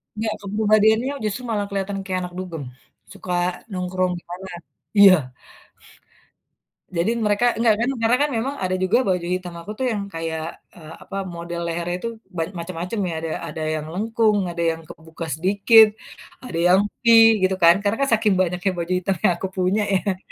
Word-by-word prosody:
Enggak 215 0 -2
kepribadiannya 215 +4 +2
justru 215 +4 -2
malah 205 -2 -1
kelihatan 195 0 -3
kayak 185 -1 -2
anak 180 - -10
dugem, 170 -6 -6 0.5
suka 180 - -8 0.4
nongkrong 185 0 -1
di - - -28
sana 185 +2 -7 0.5
iya. 195 -2 +9 1.8
Jadi 175 +6 +1
mereka 210 +3 +2
enggak 230 -1 +4
kan 240 - +1
karena 230 +2 +3
kan 295 - +2
memang 265 +5 -2
ada 185 0 0
juga 190 +5 +3
baju 180 -2 0
hitam 180 -1 -4
aku 170 +5 -8
tuh 260 - -1
yang 205 -3 -2
kayak, 165 -1 -4 0.3
eee, 160 -2 -11
apa, 195 - -10 0.2
model 170 0 -5
lehernya 170 +1 -2
itu 230 - -3 0.3
ban 165 0 -1
macem-macem 180 +4 -5
ya - - -3
ada 165 - -4 0.2
ada 160 - -6
yang 155 -1 -4
lengkung, 215 +2 +1
ada 170 - -4
yang 165 0 -7
kebuka 160 +2 -9
sedikit, 205 +6 +6 0.6
ada 180 -10 -6
yang 185 +2 +5 0.2
V - - -28 0.4
gitu 190 - +1
kan, 170 +1 +8
karena 205 +2 +2
kan 275 - +1
saking 215 -2 +2
banyaknya 180 +1 0
baju 170 +1 -2
hitam 185 +2 -1
yang 190 -4 +4
aku 190 - -3
punya 185 +3 +1
ya. 190 0 0
185 Hz, 175 wpm, -22 LUFS, 170-215 Hz, 1.8 s, iya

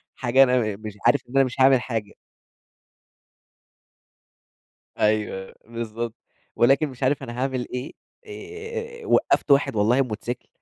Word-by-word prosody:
حاجة 130 +1 +4
أنا 125 -6 +1
م 110 - -20
مش 105 -2 -8
عارف 145 - +4
إن 135 - -10
أنا 135 - +6
مش 125 - -5
هاعمل 130 -1 +6
حاجة. 110 -4 -4 2.9
أيوه، 105 -3 0
بالضبط، 115 0 -5 0.4
ولكن 135 +5 +4
مش 130 0 -13
عارف 135 +2 +1
أنا 120 -2 -7
هاعمل 130 -1 -1
إيه 125 +1 -5 0.3
آآ، 450 +2 -7
وقّفت - - +2
واحد 140 -5 +4
والله 110 +6 +3
بموتوسيكل 120 -1 -4
125 Hz, 130 wpm, -24 LUFS, 115-135 Hz, 2.9 s, أنا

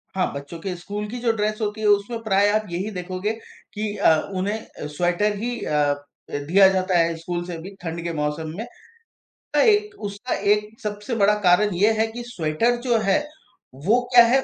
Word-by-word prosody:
हाँ, 185 - +1
बच्चों 140 +4 -7
के 185 +1 -4
स्कूल 205 +4 -5
की 245 - -5
जो 235 -1 +2
ड्रेस 215 0 0
होती 210 0 -2
है 215 - +1
उसमें 205 +3 +2
प्रायः 205 0 +3
आप 215 - +1
यही 190 +5 -3
देखोगे, 185 +2 -3 0.4
कि 210 -1 -3
अ, 200 - +5 0.3
उन्हें 205 +4 -1
अ, 150 - -9
स्वेटर 175 +7 0
ही 240 +3 -3
अ - - -2 0.6
अ, - - 0
दिया 195 +3 +7
जाता 185 -1 +1
है 165 0 +2
स्कूल 175 +1 -4
से 175 -1 -5
भी 185 - -8
ठंड 170 -1 -4
के 170 - -2
मौसम 150 +1 -2
में। 225 - -3 0.7
उसका - - -1
एक 420 0 +1 0.2
उसका 205 +5 -4 0.2
एक 210 0 +2
सबसे 210 +3 -3
बड़ा 210 -1 +4
कारण 200 +3 +4
ये 205 +5 +4
है, 225 - +3
कि 235 +2 -7
स्वेटर 185 +2 0
जो 240 -2 +2
है 195 - +4 0.7
वो 235 +5 +5
क्या 240 - +10
है, 265 +3 +3
205 Hz, 200 wpm, -23 LUFS, 175-220 Hz, 0.7 s, क्या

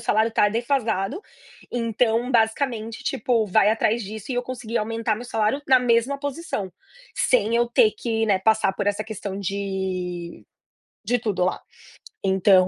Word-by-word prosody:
salário 220 +1 +2
está 210 -2 +3
defasado, 235 - -1 0.5
então, 230 +1 +1
basicamente, 225 -1 0
tipo, 225 -1 +1
vai 200 +2 +4
atrás 225 +1 +1
disso." 215 +4 -8
E - - -2
eu 245 - +1
consegui 245 -2 -5
aumentar 225 +1 -1
meu 240 - -7
salário 225 +4 0
na 260 -2 +6
mesma 245 +3 +2
posição, 285 - -4 0.4
sem 235 -2 +2
eu 240 0 +3
ter 220 -2 +4
que, 225 0 -1
né, 200 -3 +3
passar 220 0 +2
por 200 - -2
essa 205 +1 0
questão 205 -3 -6
de 190 -3 -4 0.6
de 245 0 +1
tudo 205 -6 -1
lá. 185 - -1 0.6
Então, 190 -1 +4
220 Hz, 150 wpm, -23 LUFS, 200-240 Hz, 0.6 s, na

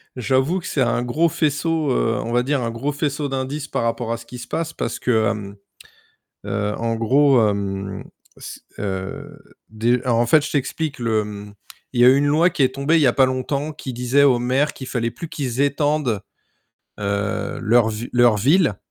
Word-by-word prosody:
j'avoue 130 - +1
que 175 - -8
c'est 140 - -1
un 120 -1 +1
gros 155 +8 +1
faisceau, 155 -1 0
heu 115 -2 +1
on 115 - -5
va 120 0 +2
dire 140 +1 0
un 115 -1 -2
gros 135 +6 -2
faisceau 145 0 -2
d'indices 135 +2 -3
par - - -2
rapport 115 0 -2
à 115 - -1
ce 115 - -13
qu'il 125 +1 -10
se 120 - -9
passe 165 0 -3
parce - - -4
que, 110 -3 +2
hem, 100 -1 -6 0.9
heu, 105 +1 -2
en 115 0 -1
gros, 135 +3 +4
hem, 100 -1 -3 0.3
c - - -9 0.2
heu, 95 -2 -5 0.3
dé 115 +3 +1
alors 120 -2 +2
en 120 - +2
fait 150 +4 +4
je - - -4
t'explique 150 +1 -2
le, 110 -3 0
mmh 105 0 -9 0.4
il - - +2
y 120 - +7
a - - +8
eu 130 - +6
une 145 +1 +2
loi 160 +5 +3
qui 145 - +1
est 130 - 0
tombée 140 +4 +2
il 160 - +3
y - - +5
a 120 - +4
pas 135 - +4
longtemps 135 +3 -2
qui 135 -3 -7
disait 125 +3 +2
aux 125 -4 +4
maires 130 +4 +1
qu'il 130 - -9
fallait 115 -1 -2
plus 165 - -8
qu'ils 130 -5 -3
étendent, 145 -5 +1 0.8
heu, 100 0 -2
leur 115 0 +3
v 110 +2 -5
leur 120 -3 +4
ville. 155 - +3
125 Hz, 210 wpm, -21 LUFS, 115-145 Hz, 0.9 s, a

